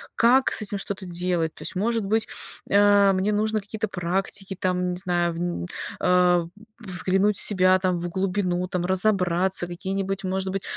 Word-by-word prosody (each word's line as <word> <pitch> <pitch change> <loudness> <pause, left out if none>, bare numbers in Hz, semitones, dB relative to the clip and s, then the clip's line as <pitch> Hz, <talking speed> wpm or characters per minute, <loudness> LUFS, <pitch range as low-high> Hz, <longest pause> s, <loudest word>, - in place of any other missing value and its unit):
как 255 +3 +4
с - - +3
этим 205 -1 -2
что-то 195 -1 -5
делать? 175 -2 -1
То - - -10
есть, - - -3
может 225 +3 -1
быть, 220 +2 +1 0.4
а, 200 0 +5
мне 190 +3 0
нужно 215 +1 0
какие-то 215 +1 -5
практики, 195 +2 -3
там 180 -1 0
не 180 - -4
знаю, 175 -2 0
вн 175 +1 -3 0.4
а, 180 -1 +3 0.3
взглянуть 190 0 +1
в - - +6
себя, 185 -2 +5
там, 185 -2 0
в 175 - -4
глубину, 185 -1 -1
там, 180 -2 -2
разобраться, 185 -2 +1
какие-нибудь, 195 +2 -4
может 190 0 -2
быть, 195 - -3
190 Hz, 165 wpm, -24 LUFS, 180-200 Hz, 0.4 s, в